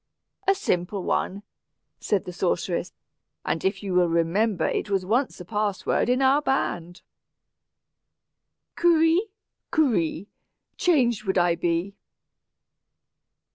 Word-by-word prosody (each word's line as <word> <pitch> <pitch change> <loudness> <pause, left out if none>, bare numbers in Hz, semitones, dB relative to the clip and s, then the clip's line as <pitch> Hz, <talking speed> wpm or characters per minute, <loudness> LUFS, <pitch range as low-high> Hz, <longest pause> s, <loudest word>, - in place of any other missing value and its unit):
"A 390 - +5
simple 180 - -1
one," 200 +3 -1 0.6
replied 200 -3 0
the 180 - -7
sorceress, 180 -1 -1 0.5
"and 165 - -1
you 195 0 -1
will 180 -1 +3
remember 170 +5 +1
it - - -2
was 195 -2 0
once 245 +7 0
a 180 - -8
password 210 +3 -1
in 255 +2 +2
our 270 +3 +4
band, 175 - -2 1.7
'Kurri 330 0 +4 0.5
kuree, 205 - +1 0.5
Changed 240 - +2
would 190 0 0
I 175 -1 +3
be.'" 170 +3 -1
195 Hz, 105 wpm, -25 LUFS, 175-250 Hz, 1.7 s, A